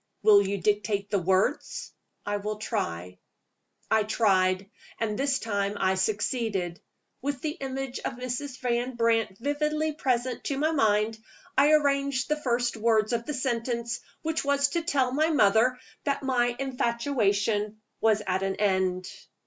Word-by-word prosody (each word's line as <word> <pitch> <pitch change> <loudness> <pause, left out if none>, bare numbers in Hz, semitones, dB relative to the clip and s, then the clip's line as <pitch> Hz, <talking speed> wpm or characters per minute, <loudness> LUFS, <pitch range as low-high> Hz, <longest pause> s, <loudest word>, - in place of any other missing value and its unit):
"Will 210 -1 +7
you 200 0 -1
dictate 205 +1 0
the 200 - +2
words?" 185 +2 0 0.3
"I 205 0 -1
will 210 +1 -3
try." 90 - -4 0.7
I 220 0 +5
tried; 195 -3 +2 0.3
and 220 -2 -1
this 275 +3 +1
time 205 -3 -2
I 190 0 +2
succeeded. 200 -2 -1 0.4
With 275 -1 -3
the 310 - -1
image 270 -3 -5
of - - -3
Mrs. 255 +2 -5
Van 245 0 -1
Brandt 225 -4 +1
vividly 300 +4 -1
present 255 -3 -1
to 275 - -1
my 310 +3 +1
mind, 220 -5 +2 0.4
I 295 +2 +5
arranged 280 -2 +2
the 300 0 0
first 245 -2 0
words 220 0 +2
of 235 0 -2
the 300 - -2
sentence 235 -2 -2 0.2
which 320 0 -1
was 280 0 +2
to 335 +4 -1
tell 275 -6 +1
my 310 +4 +2
mother 245 -2 +4 0.3
that 280 -1 -1
my 245 -2 +1
"infatuation" 230 -5 0 0.2
was 215 -1 +3
at 185 0 0
an 195 0 -1
end! 185 -2 +1
235 Hz, 150 wpm, -27 LUFS, 205-270 Hz, 0.7 s, Will